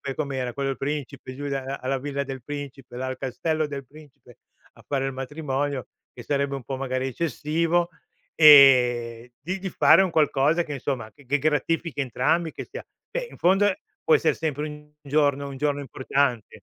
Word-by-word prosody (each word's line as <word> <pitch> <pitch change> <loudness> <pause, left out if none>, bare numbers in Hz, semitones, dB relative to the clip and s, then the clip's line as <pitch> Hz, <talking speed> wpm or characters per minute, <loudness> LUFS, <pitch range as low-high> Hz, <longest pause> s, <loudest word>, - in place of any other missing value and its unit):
com'era 130 -5 -3
quello 140 -1 -2
del 135 - -3
principe 140 -2 -5
giù 145 +1 -6
alla 135 0 -3
villa 140 0 -3
del 135 -3 -7
principe 140 -3 -8
la 130 - -3
dal 130 - -4
castello 155 +4 -2
del 140 -2 -6
principe 140 -4 -17 0.4
a - - -19
fare 135 -1 -1
il 135 - -2
matrimonio, 140 0 -3 0.3
che 120 - -10
sarebbe 140 0 -1
un 135 - -7
po' 135 +1 -4
magari 130 0 -2
eccessivo, 165 +4 0 0.5
e 125 -5 +6
di 185 +3 -4
di 190 0 -4
fare 190 - +6
un 185 - -1
qualcosa 155 +2 +2
che 150 - -6
insomma, 125 -4 -4
che 145 -2 -20
gratifichi 155 +1 0
entrambi 155 +6 0
che - - -7
sia - - -7 0.3
beh - - -3
in - - -13
fondo 195 +4 +4 0.4
può 475 - +4
essere - - +2
sempre 155 -1 -2
un 150 0 -11
giorno 140 -1 +1
un 135 - -8
giorno 145 0 0
importante. 130 -3 -1
140 Hz, 170 wpm, -25 LUFS, 130-150 Hz, 0.5 s, e